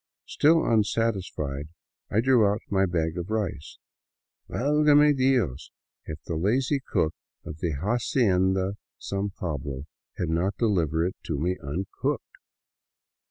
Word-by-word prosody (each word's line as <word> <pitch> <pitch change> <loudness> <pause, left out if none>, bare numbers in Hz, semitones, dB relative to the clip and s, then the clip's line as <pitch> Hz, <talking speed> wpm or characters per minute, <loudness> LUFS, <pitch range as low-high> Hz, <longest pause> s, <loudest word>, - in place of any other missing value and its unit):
Still 160 +2 +3
unsatisfied, 100 -10 0 0.4
I 110 - +2
drew 125 -2 +4
out 105 +3 -3
my 95 -1 +3
bag 85 -1 -1
of 85 +3 -5
rice. 105 -9 -3 0.7
Valgame 150 +2 +4
Dios 125 - +1 0.4
if 80 - -6
that 85 - -4
lazy 130 - +1
cook 80 -9 0 0.3
of 75 +1 -7
the 85 -2 -1
" 70 - -5
Hacienda 95 -5 +1 0.2
San 100 +1 -3
Pablo 70 -7 -5 0.2
" - - -44
had 85 - -1
not 90 +5 0
delivered 85 -8 +1
it - - -11
to - - -2
me 90 +5 0
uncooked! 80 +8 -3
95 Hz, 130 wpm, -26 LUFS, 80-115 Hz, 0.7 s, drew